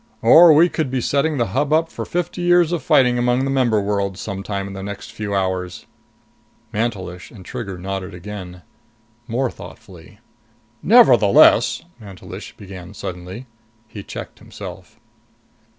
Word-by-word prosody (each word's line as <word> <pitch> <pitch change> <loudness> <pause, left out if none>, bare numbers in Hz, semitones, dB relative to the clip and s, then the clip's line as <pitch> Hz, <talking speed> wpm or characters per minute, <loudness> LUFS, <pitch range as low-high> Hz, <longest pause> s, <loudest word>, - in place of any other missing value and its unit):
Or 170 +1 +8
we 160 +3 +6
could 160 -5 -2
be 130 0 -1
setting 145 +4 0
the 120 -2 0
Hub 145 +3 0
up 160 +1 +2
for - - -6
fifty 175 +1 -3
years 175 -1 +3
of 175 - -1
fighting 125 -2 +3
among 125 +1 +1
the 135 - -1
member 125 -5 +2
worlds, 100 -2 -2
sometime 100 -1 -4
in 100 - -8
the 95 - -7
next 100 +2 -7
few 110 -2 -4
hours." 95 -2 -3 0.9
Mantelish 100 -5 -4
and 95 -6 -14
Trigger 100 -5 -6
nodded 95 +1 -5
again. 90 -2 -9 0.6
More 125 +1 -1
thoughtfully. 95 -8 -13 0.6
"Nevertheless - - +5
" 120 - -25
Mantelish 100 -3 -10
began 95 -1 -11
suddenly. 90 +8 -7 0.4
He 110 -1 -9
checked - - -9
himself. - - -11
105 Hz, 145 wpm, -20 LUFS, 95-130 Hz, 0.9 s, Or